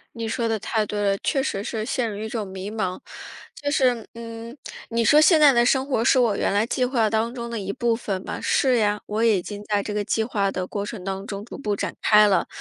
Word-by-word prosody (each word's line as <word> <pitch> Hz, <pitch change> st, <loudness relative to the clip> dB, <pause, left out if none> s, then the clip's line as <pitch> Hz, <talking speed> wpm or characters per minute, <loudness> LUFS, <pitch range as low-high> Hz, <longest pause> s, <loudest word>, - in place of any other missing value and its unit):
你 230 Hz, -1 st, -4 dB
说 230 Hz, +1 st, -1 dB
得 225 Hz, -1 st, 0 dB
太 215 Hz, +1 st, -1 dB
对 210 Hz, 0 st, -4 dB
了， 200 Hz, -1 st, +1 dB
确 270 Hz, -3 st, +1 dB
实 200 Hz, -6 st, -2 dB
是 220 Hz, -1 st, -3 dB
陷 235 Hz, 0 st, -1 dB
入 200 Hz, -, -6 dB
一 215 Hz, +1 st, -4 dB
种 220 Hz, -2 st, -4 dB
迷 190 Hz, +2 st, -6 dB
茫。 190 Hz, -4 st, -3 dB, 0.6 s
就 285 Hz, -, -3 dB
是， 250 Hz, -6 st, +1 dB
嗯， 230 Hz, +2 st, -8 dB, 0.3 s
你 230 Hz, 0 st, +1 dB
说 295 Hz, +7 st, +6 dB
现 315 Hz, 0 st, +5 dB
在 295 Hz, -2 st, +8 dB
的 240 Hz, -1 st, +3 dB
生 265 Hz, +2 st, +2 dB
活 255 Hz, -5 st, 0 dB
是 260 Hz, -, +4 dB
我 230 Hz, -5 st, +3 dB
原 -, -, 0 dB
来 205 Hz, +2 st, +2 dB
计 250 Hz, +1 st, 0 dB
划 245 Hz, -4 st, +1 dB
当 225 Hz, +2 st, -1 dB
中 235 Hz, -2 st, -5 dB
的 230 Hz, -, -3 dB
一 200 Hz, -1 st, -4 dB
部 235 Hz, +2 st, 0 dB
分 195 Hz, -5 st, -4 dB
吧？ -, -, -5 dB
是 260 Hz, -3 st, +2 dB
呀， 210 Hz, -2 st, +1 dB
我 215 Hz, +2 st, -1 dB
已 215 Hz, -5 st, +3 dB
经 205 Hz, +3 st, -8 dB
在 205 Hz, -1 st, 0 dB
这 210 Hz, -, -5 dB
个 210 Hz, 0 st, -1 dB
计 220 Hz, +1 st, 0 dB
划 205 Hz, -3 st, 0 dB
的 185 Hz, 0 st, -3 dB
过 200 Hz, +1 st, -4 dB
程 205 Hz, -2 st, -7 dB
当 195 Hz, +1 st, -4 dB
中 200 Hz, -1 st, -6 dB
逐 240 Hz, -, -9 dB
步 210 Hz, -7 st, -2 dB
展 -, -, -3 dB
开 210 Hz, -1 st, +6 dB
了。 200 Hz, -2 st, +2 dB
220 Hz, 275 characters per minute, -23 LUFS, 205-240 Hz, 0.6 s, 在